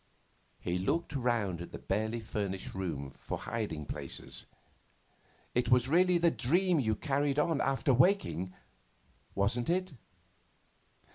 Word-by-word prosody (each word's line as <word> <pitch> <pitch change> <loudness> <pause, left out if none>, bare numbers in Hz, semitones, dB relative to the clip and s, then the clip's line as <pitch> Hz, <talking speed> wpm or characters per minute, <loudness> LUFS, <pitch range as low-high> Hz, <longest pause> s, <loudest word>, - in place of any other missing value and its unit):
He 90 +1 -1
looked 165 - 0
round 115 -9 0
at 85 - -7
the - - -6
barely 110 +3 -1
furnished 100 -3 -3
room 80 -8 -4
for - - -4
hiding 105 -10 -3
places. - - -5 1.1
'It 120 -1 +1
was 125 0 +5
really 180 +4 +4
the 170 0 +4
dream 175 +7 +2
you 110 -5 +1
carried 140 +1 0
on 150 0 +2
after 135 0 +2
waking, 130 - +3 0.8
wasn't 115 +7 +1
it? 185 -1 0
120 Hz, 125 wpm, -32 LUFS, 100-160 Hz, 1.1 s, was